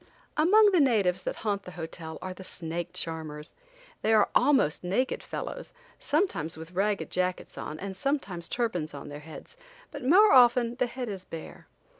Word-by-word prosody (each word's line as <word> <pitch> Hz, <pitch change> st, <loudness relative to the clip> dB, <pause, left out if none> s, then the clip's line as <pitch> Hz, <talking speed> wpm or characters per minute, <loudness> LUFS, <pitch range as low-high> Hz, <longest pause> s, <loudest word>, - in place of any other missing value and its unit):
Among 405 Hz, +7 st, +6 dB
the 365 Hz, -, +4 dB
natives 205 Hz, -, +3 dB
that -, -, -3 dB
haunt 200 Hz, -2 st, 0 dB
the 180 Hz, -, -10 dB
hotel 160 Hz, -1 st, -6 dB
are 185 Hz, -, -4 dB
the 190 Hz, -, -11 dB
snake 170 Hz, -2 st, -5 dB
charmers. 155 Hz, -2 st, -5 dB, 0.5 s
They 225 Hz, -, +2 dB
are 215 Hz, -2 st, +5 dB
almost 265 Hz, -, +3 dB
naked 200 Hz, +9 st, 0 dB
fellows, -, -, -6 dB, 0.3 s
sometimes 240 Hz, -, 0 dB
with 160 Hz, +2 st, -9 dB
ragged 200 Hz, +2 st, -1 dB
jackets 180 Hz, 0 st, -2 dB
on 155 Hz, -, -6 dB
and 195 Hz, 0 st, -5 dB
sometimes 195 Hz, -, -2 dB
turbans 180 Hz, -11 st, -2 dB
on 140 Hz, -, -8 dB
their 145 Hz, 0 st, -7 dB
heads, 160 Hz, -, -12 dB, 0.3 s
but 290 Hz, -3 st, -7 dB
more 380 Hz, +11 st, +6 dB
often 240 Hz, -2 st, +6 dB
the 250 Hz, -1 st, +1 dB
head 245 Hz, +1 st, -5 dB
is 195 Hz, -3 st, -5 dB
bare. 165 Hz, -3 st, -9 dB
195 Hz, 170 wpm, -28 LUFS, 165-255 Hz, 0.5 s, Among